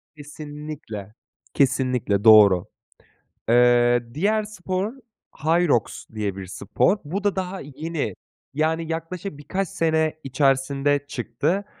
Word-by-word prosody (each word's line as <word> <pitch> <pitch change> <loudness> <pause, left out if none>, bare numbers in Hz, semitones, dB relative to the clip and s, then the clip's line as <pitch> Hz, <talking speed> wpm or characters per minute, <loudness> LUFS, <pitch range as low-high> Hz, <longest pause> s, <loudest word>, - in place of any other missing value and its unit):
Kesinlikle. 145 -8 -8 0.4
Kesinlikle, 125 -6 +1
doğru. 105 -5 +7 0.8
Eee, 120 0 +5
diğer 210 +8 +1
spor, 195 0 -3 0.5
Hyrox 160 - +1
diye 105 -3 -2
bir 95 -1 -7
spor. 100 - 0
Bu 185 +7 -4
da 205 -1 +1
daha 190 0 -3
yeni. 150 +3 -4 0.4
Yani, 160 +2 0
yaklaşık 165 +1 -5
birkaç 185 +5 -3
sene 160 -1 0
içerisinde 135 +1 +1
çıktı. 145 - -2
145 Hz, 100 wpm, -23 LUFS, 120-165 Hz, 0.8 s, doğru